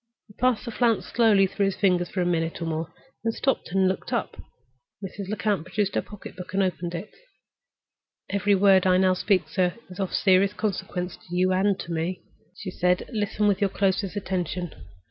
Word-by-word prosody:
He - - -15
passed 250 +1 +1
the 235 - -4
flounce 230 -1 +1
slowly 220 -4 +4
through 195 +1 0
his 195 - -1
fingers 180 -3 +2
for 185 - -2
a - - +1
minute 165 -2 0
or 170 - -3
more, 165 0 -3 0.3
then 225 -1 0
stopped 265 -10 -1
and 190 0 +3
looked 185 0 -2
up. - - -1 0.7
Mrs. 195 0 -7
Lecount 210 -4 0
produced 200 +2 -1
her - - +1
pocket 210 -2 -11
book 185 0 -8
and 195 - +3
opened 175 -1 -2
it. 190 +5 -6 1.2
"Every 200 0 +2
word 190 -1 +5
I 185 0 +5
now 185 0 +4
speak, 185 0 +1
sir, 180 -2 0 0.2
is 180 - -10
of 190 -2 -1
serious 190 0 +3
consequence 190 -4 -3
to 175 - -9
you 185 +1 +3
and 195 +1 +2
to 170 - -7
me," 170 +2 -2 0.3
she 190 - -6
said. 180 +4 0
"Listen 210 -1 0
with 200 -1 +2
your 200 - +3
closest 195 0 0
attention. 180 -3 -3
190 Hz, 195 wpm, -25 LUFS, 180-205 Hz, 1.2 s, word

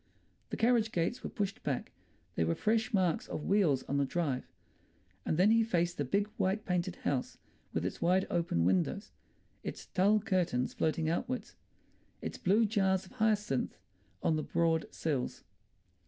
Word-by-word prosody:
The - - -4
carriage 230 -1 +3
gates 170 +8 -1
were - - -3
pushed 200 -3 -3
back; 135 -4 -2 0.4
there 80 - 0
were 85 - +1
fresh 220 +2 +1
marks 185 -6 +1
of 150 - -5
wheels 175 -10 +3
on 140 - -2
the 140 - +3
drive. 140 -4 -1 0.8
And 155 - +1
then 190 +5 +5
he 225 0 +5
faced 175 -6 0
the - - +2
big 200 +10 +1
white 195 +3 0
painted 180 0 -1
house, 130 -3 -1 0.3
with - - -1
its - - -4
wide 185 +2 +3
open 165 - +1
windows, 90 -1 +1 0.5
its - - -6
tulle 205 +3 +3
curtains 180 - 0
floating 160 0 0
outwards, 245 +10 -2 0.6
its - - -5
blue 210 +5 +4
jars 190 -3 +1
of - - -16
hyacinths 210 - 0 0.5
on 160 - +2
the 155 - -1
broad 165 -1 +1
sills. 140 -6 -2
180 Hz, 160 wpm, -32 LUFS, 155-210 Hz, 0.8 s, then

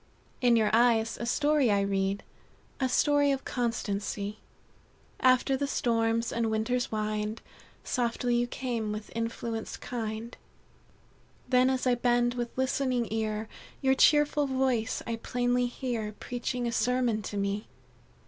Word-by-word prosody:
"In 245 -2 +5
your 220 -2 +3
eyes 230 -1 +3
a 235 - -2
story 295 0 +3
I 200 -1 +3
read 195 0 0 0.6
A 260 -1 +1
story 290 +2 +3
of 270 -1 -2
constancy. 210 -3 -2 0.8
After 255 +1 +4
the 280 +1 -1
storms 230 -3 +1
and 230 -1 0
winter's 235 +3 0
wind, 215 0 -2 0.4
Softly 245 0 0
you 240 0 +1
come 235 -4 -3
with 210 0 -6
influence 230 0 -4
kind; 225 -1 -5 1.1
Then 255 0 +4
as 260 -1 0
I 250 - +4
bend 240 0 +2
with 240 -1 -3
listening 260 -2 0
ear, 220 -1 -2 0.4
Your 265 0 +4
cheerful 295 +1 +4
voice 260 -3 0
I 230 -1 -3
plainly 245 +1 0
hear, 240 -4 -3
Preaching 245 +2 -4
a 235 - 0
sermon 245 -2 +1
to 205 - -5
me. 200 +2 -2
240 Hz, 135 wpm, -29 LUFS, 220-255 Hz, 1.1 s, In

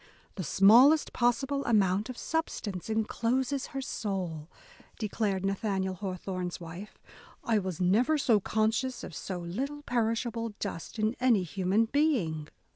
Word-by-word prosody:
"The 185 - -5
smallest 235 - +6
possible 270 +3 +1
amount 205 -1 +2
of 255 - -6
substance 220 - -3
encloses 245 +5 0
her 270 - -5
soul," 180 -9 -4 0.5
declared 205 -3 -1
Nathaniel 195 -1 -1
Hawthorne's 185 -1 -4
wife, 175 +5 -9 0.5
I 225 -3 +2
was 185 -4 -4
never 225 +12 +3 0.3
conscious 225 +4 0
of - - -7
so 185 +5 -5
little 260 +13 -4
perishable 230 -2 -1
dust 200 0 -5
in 215 +2 0
any 240 -6 +3
human 190 +5 +1
being." 220 - 0
215 Hz, 120 wpm, -29 LUFS, 185-245 Hz, 0.5 s, smallest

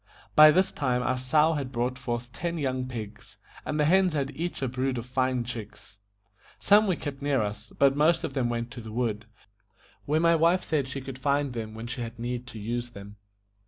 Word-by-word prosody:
By 155 0 +10
this 185 +5 +3
time 125 -3 0
our 130 - +1
sow 150 +5 +3
had 140 -4 -3
brought 125 +1 -1
forth 120 -1 -4
ten 170 +1 -3
young 130 -3 -2
pigs, 110 -4 -8 0.3
and 150 - -3
the 150 - +4
hens 185 +2 +4
had 140 -2 -1
each 170 -2 -4
a - - +1
brood 130 +1 -1
of 120 - -4
fine 130 -1 0
chicks. 110 -4 -9 0.6
Some 210 +1 +5
we 185 - +2
kept 140 -3 -6
near 140 -5 +1
us, 105 +1 -6
but 140 -1 +4
most 160 +3 +3
of - - -3
them 130 -3 0
went 120 0 -3
to 125 - -8
the 110 -1 -9
wood, 110 -2 -2 0.8
where 150 +5 +1
my 170 0 +4
wife 170 +3 +3
said 145 -4 0
she 135 +1 -5
could 130 -1 -8
find 140 0 0
them 110 -2 -5
when 110 +1 -7
she 120 +1 -4
had 115 0 -6
need 120 +1 -4
to 125 - -9
use 120 +3 -3
them. 100 -2 -11
130 Hz, 215 wpm, -27 LUFS, 120-150 Hz, 0.8 s, By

